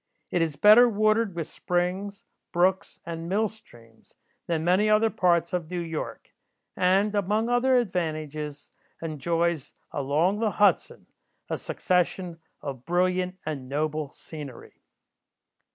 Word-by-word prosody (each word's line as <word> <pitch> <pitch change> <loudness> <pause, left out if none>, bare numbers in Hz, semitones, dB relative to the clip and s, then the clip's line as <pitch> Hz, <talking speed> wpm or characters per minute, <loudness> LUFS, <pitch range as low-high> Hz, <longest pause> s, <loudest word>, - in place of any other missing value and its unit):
It 175 - +1
is 160 -3 0
better 215 +8 +7
watered 215 -2 +2
with 165 -2 -2
springs, 185 +3 -2 0.3
brooks, 185 +2 +1
and 165 0 -5
mill 215 +4 +2
streams, 115 - -18 0.3
than 165 -2 0
many 185 +5 +3
other 215 +1 +4
parts 175 -5 +2
of 170 -3 -2
New 180 -1 -3
York, 165 -2 -5 0.4
and, 195 +3 +2
among 210 +3 +1
other 250 +1 +3
advantages, 155 - -3 0.3
enjoys, 165 0 -1 0.2
along 155 +8 +1
the 220 -2 0
Hudson, 205 -1 +2 0.5
a - - 0
succession 180 -1 -1 0.2
of 135 -4 -6
brilliant 180 +2 0
and 140 -5 -5
noble 150 +1 -1
scenery. 145 -4 -11
175 Hz, 120 wpm, -26 LUFS, 155-205 Hz, 0.5 s, better